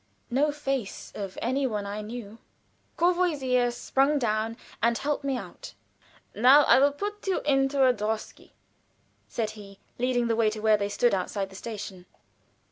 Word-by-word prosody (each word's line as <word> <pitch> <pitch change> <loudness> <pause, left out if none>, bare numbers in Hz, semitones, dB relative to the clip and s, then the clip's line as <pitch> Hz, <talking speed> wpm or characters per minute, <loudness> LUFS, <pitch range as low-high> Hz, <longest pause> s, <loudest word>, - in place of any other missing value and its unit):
No 290 +4 +2
face 270 -7 -4
of 195 -2 -6
any 265 +3 +1
one 210 -4 -3
I 205 +1 -4
knew. 220 0 -8 0.6
Courvoisier 300 -9 +2
sprung 270 +4 +1
down 225 -2 -1 0.2
and 235 0 +2
helped 290 +2 -2
me 275 -2 -1
out. - - -9 0.6
"Now 260 +7 +7
I - - +6
will 285 +1 +5
put 410 +7 -6
you 380 - +1
into 270 -1 +2
a 255 - +5
drosky," 215 0 -4 0.8
said 220 -2 -2
he, 200 -2 -12 0.2
leading 245 -1 +1
the 230 -1 +1
way 225 -1 +3
to 215 0 -6
where 215 0 +4
they 200 -1 -2
stood 240 +2 +2
outside 195 +1 -2
the - - -12
station. 195 -4 -7
240 Hz, 160 wpm, -27 LUFS, 215-275 Hz, 0.8 s, Now